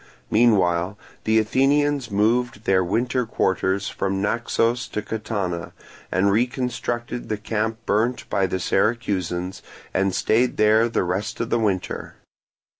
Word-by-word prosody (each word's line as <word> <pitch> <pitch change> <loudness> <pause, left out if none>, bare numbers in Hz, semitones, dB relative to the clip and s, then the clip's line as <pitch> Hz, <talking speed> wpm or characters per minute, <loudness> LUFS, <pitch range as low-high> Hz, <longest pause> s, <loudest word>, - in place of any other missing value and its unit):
Meanwhile 95 -5 +3 0.3
the 110 0 +3
Athenians 135 +3 +2
moved 110 +2 +1
their 95 -3 +3
winter 125 +7 0
quarters 95 -1 0
from 95 0 -2
Naxos 115 +3 0
to 105 - -4
Catana, 100 -6 -3 0.4
and 95 +2 +3
reconstructed 120 +1 -2
the 110 - -1
camp 110 +1 -2
burnt 120 +4 0
by 95 -1 +1
the 95 - -2
Syracusans, 95 -4 -1 0.3
and 95 0 +1
stayed 120 +3 +2
there 110 +2 +4
the 115 - 0
rest 95 +4 -2
of 115 - -3
the 120 - +2
winter. 100 -5 -2
110 Hz, 125 wpm, -23 LUFS, 95-120 Hz, 0.4 s, there